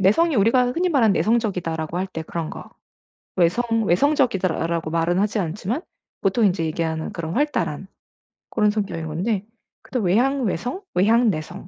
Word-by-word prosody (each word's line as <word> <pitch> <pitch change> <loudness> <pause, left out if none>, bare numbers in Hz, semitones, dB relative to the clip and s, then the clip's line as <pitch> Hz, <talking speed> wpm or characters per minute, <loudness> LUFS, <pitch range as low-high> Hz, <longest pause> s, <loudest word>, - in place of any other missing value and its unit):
내성이 300 - +3
우리가 245 +4 +3
흔히 360 +6 +1
말하는 250 - +3
"내성적이다."라고 180 -8 0
할 185 - -1
때 165 -3 -5
그런 160 0 -4
거 - - -9 0.7
"외성 180 +7 +2 0.2
외성적이다."라고 185 - +1
말은 165 +2 +1
하지 210 +2 +1
않지만 200 - -2 0.4
보통 205 +3 +2
인제 180 -3 +1
얘기하는 160 0 -2
그런 165 -1 -4
활달한 295 +2 -1 0.6
고런 210 -2 +2
성격인 200 -6 -3
건데 190 +6 -2 0.4
근데 255 - -3
외향 255 +9 +2
외성, 245 - -2
외향 225 +5 +4
내성, 175 +2 -5
195 Hz, 355 characters per minute, -22 LUFS, 170-235 Hz, 0.7 s, 외향